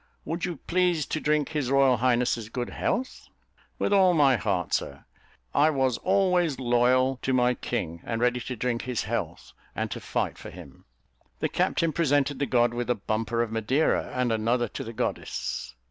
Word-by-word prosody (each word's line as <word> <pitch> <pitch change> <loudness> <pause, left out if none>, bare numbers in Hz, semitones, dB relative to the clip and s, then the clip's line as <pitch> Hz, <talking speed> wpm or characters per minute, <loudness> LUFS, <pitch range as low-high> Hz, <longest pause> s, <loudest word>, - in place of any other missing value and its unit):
Would 170 +2 -2
you 175 -1 -3
please 175 -3 +1
to 155 - -3
drink 150 -1 +1
his 150 -5 -2
royal 135 -2 +4
highness's 120 -2 +1
good 120 +1 -4
health?" 260 +1 -3 0.5
"With - - 0
all 185 -3 +5
my 140 -4 +5
heart, 90 -4 -1
sir; - - -2 0.5
I 150 +2 +4
was 130 -5 0
always 180 -6 +2
loyal 130 +1 +2
to 130 - 0
my 125 0 +3
king, 85 -10 -4
and 115 -1 -3
ready 125 +1 +2
to 125 +1 -5
drink 120 0 -1
his 125 -2 -2
health, - - -4 0.2
and - - -3
to - - -4
fight - - -3
for - - -9
him." 65 - -13 0.5
The - - 0
captain 165 -2 0
presented 145 -3 +1
the 140 - 0
god 120 -1 +2
with 120 0 -3
a 125 - +3
bumper 115 +3 -1
of 115 - -5
Madeira, 115 +7 +1
and 125 -2 0
another 115 +2 +1
to - - -6
the 115 - -7
goddess. - - -3
125 Hz, 180 wpm, -26 LUFS, 120-150 Hz, 0.5 s, all